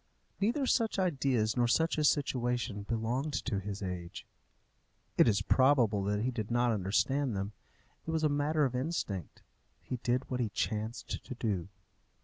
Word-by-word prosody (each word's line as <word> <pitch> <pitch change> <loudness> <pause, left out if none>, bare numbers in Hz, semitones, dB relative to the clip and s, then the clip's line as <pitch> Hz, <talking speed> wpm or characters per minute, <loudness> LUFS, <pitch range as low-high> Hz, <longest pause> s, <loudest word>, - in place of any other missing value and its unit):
Neither 240 +8 +1
such 230 -4 +2
ideas 135 - +1
nor 120 -1 +3
such 160 +6 +2
a - - +2
situation 125 -7 +1
belonged 120 +6 -1
to 105 -7 0
his 100 +1 -5
age. 90 -2 -5 0.9
It - - +6
is 100 -3 +3
probable 125 -7 +4
that 105 +1 0
he 130 - 0
did 110 -4 -4
not 120 0 +2
understand 110 +6 +1
them. 100 +2 -3 0.5
It - - -3
was 160 -1 0
a - - +5
matter 145 +1 +2
of 130 - -1
instinct. 125 - -3 0.4
He 125 - -5
did 125 +2 0
what 125 - -3
he 115 -3 0
chanced 110 +2 -3
to 130 - -7
do. 100 -7 -1
120 Hz, 160 wpm, -32 LUFS, 105-145 Hz, 0.9 s, It